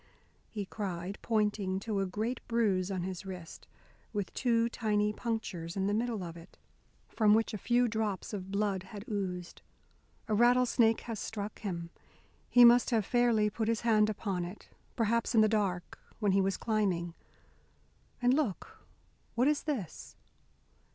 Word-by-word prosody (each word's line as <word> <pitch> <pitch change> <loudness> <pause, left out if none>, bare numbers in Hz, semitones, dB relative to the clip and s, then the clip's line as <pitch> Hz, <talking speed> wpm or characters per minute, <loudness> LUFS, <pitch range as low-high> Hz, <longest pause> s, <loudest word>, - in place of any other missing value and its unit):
he 205 -3 -4
cried, 190 -2 -5
pointing 210 -4 0
to 205 0 -2
a 195 - 0
great 220 +6 -2
bruise 205 -6 +1
on 185 -3 -2
his 185 0 -5
wrist, 180 -4 -9 0.5
with 205 -3 -3
two 230 -2 +2
tiny 210 -2 0
punctures 200 -7 -4
in 190 - 0
the 205 - +1
middle 225 -2 -1
of 170 -1 -7
it 170 0 -14 0.5
from 215 -2 +4
which 225 0 +1
a - - -2
few 245 +3 +2
drops 215 -3 -2
of 190 -2 -5
blood 200 -1 0
had 200 +2 -10
oozed, 185 -4 -4 0.7
"a 215 - -1
rattlesnake 240 0 +4
has 230 -3 -5
struck 210 -1 -5
him. 170 -5 -5 0.6
He 245 -1 +8
must 240 +1 +6
have 225 -5 +1
fairly 240 -3 +3
put 215 +2 -2
his 230 -1 0
hand 215 -2 +3
upon 195 -4 -2
it, 180 +4 -9 0.3
perhaps 230 +1 +1
in 220 - +7
the 215 - +5
dark, 200 -5 -1 0.2
when 205 -3 +1
he 195 +1 +4
was 195 0 0
climbing. 190 -6 0 1.1
And, 245 +1 +5
look, 265 - -2 0.6
what 250 +3 +3
is 300 -1 +2
this?" 235 - -5
210 Hz, 160 wpm, -31 LUFS, 190-230 Hz, 1.1 s, He